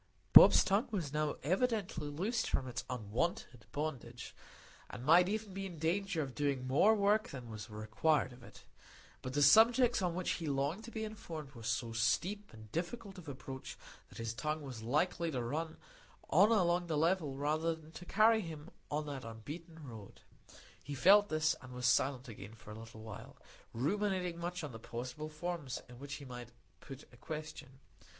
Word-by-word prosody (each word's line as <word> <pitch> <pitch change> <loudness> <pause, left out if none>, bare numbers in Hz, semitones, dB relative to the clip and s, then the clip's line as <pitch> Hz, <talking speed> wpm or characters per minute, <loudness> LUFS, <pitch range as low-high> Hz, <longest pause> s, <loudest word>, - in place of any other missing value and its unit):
Bob's - - +10
tongue 205 +5 +2
was 175 - -3
now 150 0 0
evidently 190 - 0
loosed 200 +11 -1
from 130 - 0
its 125 0 -4
unwonted 125 +2 -3
bondage, 130 -6 -5 0.6
and 120 - -8
might 175 +4 +6
even 215 -1 -3
be 195 0 -4
in 175 -3 -9
danger 170 +1 0
of 135 -2 -7
doing 140 -3 -1
more 155 +12 +5
work 210 +1 +2
than 125 -4 -8
was 110 +2 -7
required 110 +7 0
of 125 - -15
it. 120 - -14 0.6
But 130 - -5
the 145 +1 +3
subjects 230 - +6
on 175 -2 0
which 185 0 -1
he 165 - -3
longed 145 +9 -1
to 235 - -9
be 220 -1 -4
informed 165 -9 -7
were 120 -4 -12
so 115 +1 -1
steep 195 - 0
and 110 -1 -13
difficult 190 - -4
of 160 -4 -9
approach, 130 0 -7 0.3
that - - -13
his 115 0 -3
tongue 150 +5 -2
was 130 -5 -7
likely 160 +8 +1
to 130 -6 -2
run 155 +6 -3 0.5
on 210 +3 +6
along 175 -4 +3
the 160 -3 0
level 160 -3 +1
rather 155 +3 0
than 160 -1 -15
to 175 - -9
carry 220 +3 +4
him 160 -5 -8 0.2
on 150 +1 -1
that 140 -3 -5
unbeaten 150 +8 -9
road. 110 -5 -11 0.6
He 145 - -6
felt 205 +8 +6
this, 155 0 +2
and 130 -2 -11
was 125 0 -4
silent 130 +1 +2
again 105 -1 -9
for 110 -1 -12
a 110 - -8
little 110 -1 -11
while, 110 -2 -9 0.3
ruminating 180 - -1
much 175 0 -4
on 150 - -5
the 115 - -9
possible 125 +7 -6
forms 155 -4 -4
in 125 -1 -13
which 140 +1 -6
he 140 - -9
might 120 -2 -8 0.3
put 135 0 -10
a - - -15
question. 150 -2 -7
150 Hz, 185 wpm, -35 LUFS, 125-180 Hz, 0.6 s, Bob's